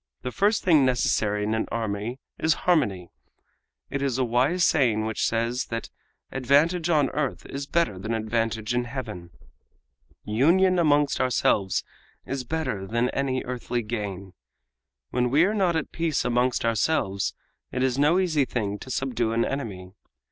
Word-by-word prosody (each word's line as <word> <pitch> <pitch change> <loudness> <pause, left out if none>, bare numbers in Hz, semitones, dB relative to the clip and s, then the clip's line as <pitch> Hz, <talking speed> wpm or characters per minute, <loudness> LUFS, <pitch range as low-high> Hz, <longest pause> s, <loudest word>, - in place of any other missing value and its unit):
The 125 - -3
first 205 - +1
thing 160 -6 +5
necessary 105 -5 +1
in 105 +1 0
an 110 - -1
army 110 +1 -3 0.2
is 160 -1 +2
harmony. 105 - +1 0.8
It 140 - -2
is 135 -3 0
a 130 - +2
wise 130 +9 +2
saying 115 -10 +3
which 110 0 -2
says 115 +2 -1
that 115 0 -5 0.4
'Advantage 150 +7 +2
on 150 -5 +3
earth 145 -2 -2
is 140 +1 -6
better 165 - 0
than 110 +4 -4
advantage 110 0 -1
in 120 0 0
Heaven!' 115 -9 -6 0.9
Union 175 - +3
amongst 145 -4 +3
ourselves 105 -6 +1 0.4
is 135 -1 -3
better 125 -9 -3
than 120 +4 0
any 130 -2 -1
earthly 125 -1 -3
gain. 100 -4 -5 0.8
When 125 0 +1
we 150 +7 +4
are 205 - 0
not 190 -5 +1
at 160 - -2
peace 165 -3 -1
amongst 125 0 +1
ourselves 110 -4 0 0.4
it 130 - -1
is 130 0 +1
no 150 +5 +4
easy 165 -6 +2
thing 105 -5 -3
to - - -10
subdue 120 -3 -1
an 115 +1 +2
enemy. 95 -9 -5
125 Hz, 155 wpm, -25 LUFS, 110-145 Hz, 0.9 s, thing